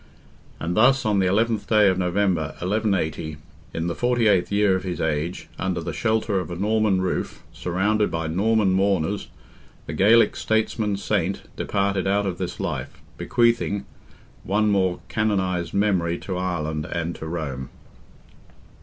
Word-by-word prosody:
And 85 +1 -2
thus 130 +3 +4
on 105 -2 +2
the 95 - +2
11th 110 +2 +1
day 105 -2 +5
of 95 -1 +2
November, 90 -4 0
1180, 90 -6 -1 0.3
in 80 - -3
the 85 - -1
48th 115 -6 +2
year 100 -1 +3
of 95 - -1
his 90 -2 -4
age, 80 +2 -2
under 95 -2 -1
the 80 - -4
shelter 110 -3 0
of 90 - -5
a 85 - -4
Norman 105 0 +1
roof, 95 - -3
surrounded 105 +4 0
by 80 0 -3
Norman 100 +5 +2
mourners, 95 0 +1 0.6
the - - -5
Gaelic 115 +4 +5
statesman 110 -2 0
saint 95 -1 -1
departed 100 -1 0
out 100 +1 +2
of 90 -3 -3
this - - -4
life, - - -4 0.2
bequeathing—one 105 -2 -1
more 95 -3 +1
canonized 95 -6 0
memory 95 -5 +1
to 95 - -5
Ireland 80 -4 -2
and 85 0 -2
to 80 - -7
Rome. 70 -6 -4
95 Hz, 145 wpm, -23 LUFS, 85-105 Hz, 0.6 s, day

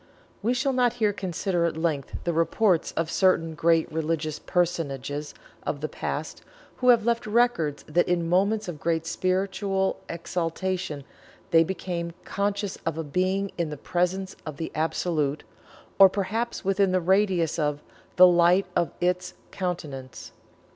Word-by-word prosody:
We 235 +5 +1
shall 265 +1 +1
not 250 -2 +3
here 210 -2 +1
consider 180 -2 -1
at 165 -2 -1
length 160 -5 -2
the 170 - 0
reports 170 +2 +2
of 165 -1 -2
certain 165 -4 +2
great 165 +1 +2
religious 155 -1 -2
personages 150 -4 -2 0.3
of - - -3
the - - -2
past, - - -5 0.4
who 250 - +2
have 235 -3 +5
left 235 -2 0
records 210 -10 +1
that 170 +3 +1
in 175 -1 +1
moments 200 +5 +2
of 165 -4 -6
great 165 0 0
spiritual 190 +2 0
exaltation 170 -1 -3 0.5
they 165 0 +6
became 170 -1 -4
conscious 200 0 -2
of 160 -3 -4
"being 190 +2 +1
in 170 -2 0
the 150 - -6
presence 180 +5 -1
of 155 -3 -7
the 160 - -4
Absolute," 155 -2 -1 0.6
or 195 -1 +10
perhaps 210 +4 -2
within 195 -1 +2
the 185 - +3
radius 185 -3 +2
of 150 -1 -1 0.3
"the 185 - +9
light 175 +2 +5
of 170 - +2
Its 180 +1 0 0.2
countenance." 150 -8 -5
175 Hz, 145 wpm, -26 LUFS, 160-195 Hz, 0.6 s, or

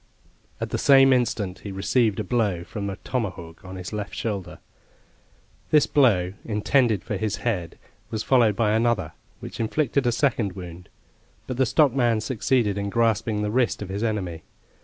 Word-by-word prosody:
At - - -4
the - - -1
same 135 -1 +6
instant 110 -7 -1
he 100 - -7
received 105 +2 +1
a - - -1
blow 105 -8 0
from 100 +3 -5
a 95 - -4
tomahawk 95 -10 -4
on 95 0 -9
his 90 +2 -7
left 105 -1 -5
shoulder. 100 -5 -4 1.1
This 150 -1 +5
blow, 100 -10 +3
intended 110 0 +1
for 105 - -3
his 105 +1 -1
head, 90 -9 -2 0.3
was 110 -1 -3
followed 120 -6 +3
by 110 -2 +1
another, 115 -2 +1 0.3
which - - -8
inflicted 130 +3 0
a - - +3
second 115 -6 0
wound; 90 -2 -10 0.6
but 125 - -5
the 130 -1 +2
stockman 125 -7 +3
succeeded 110 -2 0
in 100 0 -2
grasping 110 -1 +1
the 105 - -1
wrist 120 -3 +1
of 95 - -8
his 100 +2 -4
enemy. 95 -7 -2
110 Hz, 165 wpm, -24 LUFS, 100-120 Hz, 1.1 s, same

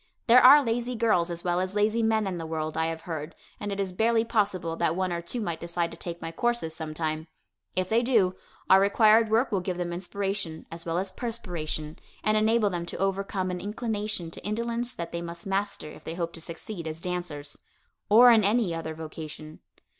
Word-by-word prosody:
There 250 +1 +7
are 285 +3 +9
lazy 240 +1 -1
girls 215 -7 +2
as 170 0 -4
well 175 0 +1
as 185 +2 -2
lazy 215 +2 +2
men 220 -1 +2
in 185 -3 -3
the 165 - -4
world, 155 -1 -3
I 160 0 +1
have 165 0 -4
heard, 160 -1 -5 0.2
and 205 - -4
it 200 - -3
is 190 -2 -2
barely 225 +3 +2
possible 195 -7 0
that 160 - +1
one 185 -1 0
or 170 - -2
two 170 +8 -3
might 170 -7 -3
decide 170 0 -2
to - - -8
take 170 -1 -6
my 165 - -4
courses 235 -6 -1
sometime. 155 0 -3 0.5
If 185 0 0
they 225 +1 +3
do, 225 -7 +3 0.3
our 190 - +7
required 215 +2 +5
work 230 +4 +2
will 200 - +2
give 180 -1 -3
them 175 -1 -2
inspiration, 190 -2 -3
as 165 +1 -6
well 165 +1 0
as 190 +1 -2
perspiration, 175 -9 -4 0.2
and 215 - +2
enable 215 -1 +3
them 170 -1 -3
to - - -5
overcome 195 -1 -1
an 180 - -4
inclination 210 -4 -2
to - - -8
indolence 235 +3 -2
that 170 -9 -6
they 170 - -3
must 170 0 -7
master 195 -5 -2
if - - -13
they 165 - -5
hope 170 -1 -3
to 165 - -5
succeed 170 +1 -5
as 160 0 -5
dancers 170 -5 -4 0.5
or 240 +4 +9
in 225 -2 +5
any 205 -3 +2
other 160 -1 -4
vocation. 155 -1 -8
185 Hz, 210 wpm, -27 LUFS, 165-220 Hz, 0.5 s, are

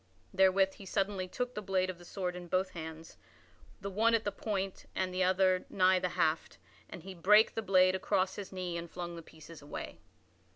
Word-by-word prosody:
Therewith 190 0 +4
he 195 - -12
suddenly 195 -1 -1
took 250 +6 -3
the 210 - -4
blade 185 -2 0
of 175 - -14
the 175 - -13
sword 180 -1 -3
in 180 -1 -8
both 185 +2 0
hands 160 -1 -8 0.6
the 200 - -4
one 225 +4 +3
at 225 - 0
the 205 - -1
point 195 -3 -4
and 185 -1 -1
the 185 - -1
other 185 0 +3
nigh 185 -1 +4
the 180 - -1
haft 160 0 0 0.3
and 175 - -9
he 190 +1 -8
brake 210 +5 +5
the 225 - -2
blade 185 -2 +4
across 190 0 0
his 200 -2 -7
knee 180 -2 -4
and 170 0 -6
flung 175 0 -6
the 165 - -7
pieces 160 0 -13
away. 145 - -7
185 Hz, 205 wpm, -32 LUFS, 175-195 Hz, 0.6 s, brake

